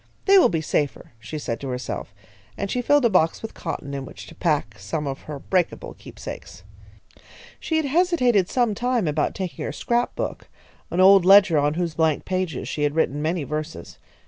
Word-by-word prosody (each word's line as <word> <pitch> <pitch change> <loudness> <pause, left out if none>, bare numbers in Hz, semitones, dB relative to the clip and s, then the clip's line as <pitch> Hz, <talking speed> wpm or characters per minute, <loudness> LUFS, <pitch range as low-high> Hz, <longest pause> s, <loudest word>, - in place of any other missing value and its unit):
"They 395 0 +7
will 250 - +5
be 165 -5 -1
safer," 150 -2 -2
she 110 +7 -7
said 115 -6 -4
to 140 - -6
herself, 125 -4 -5 0.5
and 200 - -3
she 250 - 0
filled 285 +2 +3
a - - +5
box 165 -1 +2
with 225 - -6
cotton 145 -4 -5
in 135 -1 -4
which - - -10
to - - -13
pack 145 - -1
some 125 +11 -4
of 135 -1 -4
her 150 - -4
breakable 180 +4 -1
keepsakes. - - -10 1.0
She 320 - -2
had 315 - 0
hesitated 270 - +2
some 240 -4 +1
time 240 -3 0
about 150 0 0
taking 180 -8 -5
her - - -3
scrap 240 +10 -1
book, - - -5 0.4
an 180 - +1
old 195 0 +7
ledger 190 -4 +6
on 145 +1 +1
whose 170 -2 -2
blank 160 -2 +1
pages 185 -6 -2
she 150 - -4
had 145 0 +1
written 150 -2 0
many 160 +1 -1
verses. 150 - -6
165 Hz, 195 wpm, -23 LUFS, 145-210 Hz, 1.0 s, They